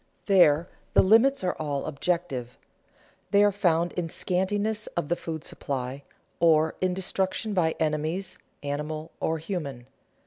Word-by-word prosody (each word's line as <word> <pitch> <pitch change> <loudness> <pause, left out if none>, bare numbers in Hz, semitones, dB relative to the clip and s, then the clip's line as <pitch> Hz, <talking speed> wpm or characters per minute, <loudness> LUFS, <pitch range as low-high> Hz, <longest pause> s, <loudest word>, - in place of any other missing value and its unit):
There 175 -4 +5 0.3
the - - +7
limits 230 +6 +5
are 180 - 0
all 145 -3 -2
objective; 155 -5 -2 0.7
they 200 +1 +5
are 205 - +5
found 175 -4 +1
in 175 -2 -3
scantiness 205 +5 0
of 160 -4 -1
the 175 - +2
food 160 -3 -6
supply, 135 0 -4 0.4
or 160 -1 +4
in 185 -1 +1
destruction 190 +3 -1
by 165 -4 +2
enemies, 160 +4 -1 0.2
animal 150 +2 -4
or 160 - 0
human. 155 -7 -5
170 Hz, 135 wpm, -27 LUFS, 155-190 Hz, 0.7 s, the